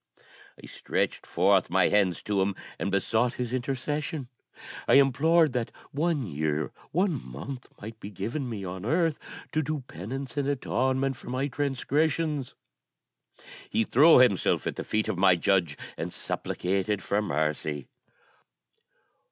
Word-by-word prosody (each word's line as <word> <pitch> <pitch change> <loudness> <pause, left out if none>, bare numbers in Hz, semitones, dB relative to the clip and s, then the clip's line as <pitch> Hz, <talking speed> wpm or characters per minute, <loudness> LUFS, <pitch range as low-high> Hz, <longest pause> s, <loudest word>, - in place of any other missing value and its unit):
I - - -11
stretched - - -2
forth - - +3
my - - +3
hands 95 -4 +2
to 100 -2 0
him, 95 0 0 0.2
and - - -1
besought 110 +5 +1
his 125 -1 -3
intercession. 135 +2 -2 0.6
I - - +5
implored 140 +3 +4
that 120 -2 -2 0.2
one 150 -2 0
year, 75 - -2 0.2
one 175 - +1
month, 100 - -7
might 110 +2 -9
be 100 - -7
given 105 +9 -4
to - - -4
me 105 -5 -5
on 90 +1 -6
earth 160 - +1 0.3
to 155 - +1
do 155 -1 -3
penance 125 - -7
and 140 -1 0
atonement 130 -1 0
for - - -10
my 130 +2 -1
transgressions. 145 +1 0 1.1
He 115 - +2
threw 150 +9 +6
himself 125 -7 +3
at - - -2
the - - -4
feet 110 0 -1
of 90 - -2
my 95 -2 +6
Judge, 85 -4 +1 0.2
and - - -4
supplicated 95 +2 -2
for 100 +1 +1
mercy. 75 -5 -2
125 Hz, 145 wpm, -28 LUFS, 95-140 Hz, 1.1 s, threw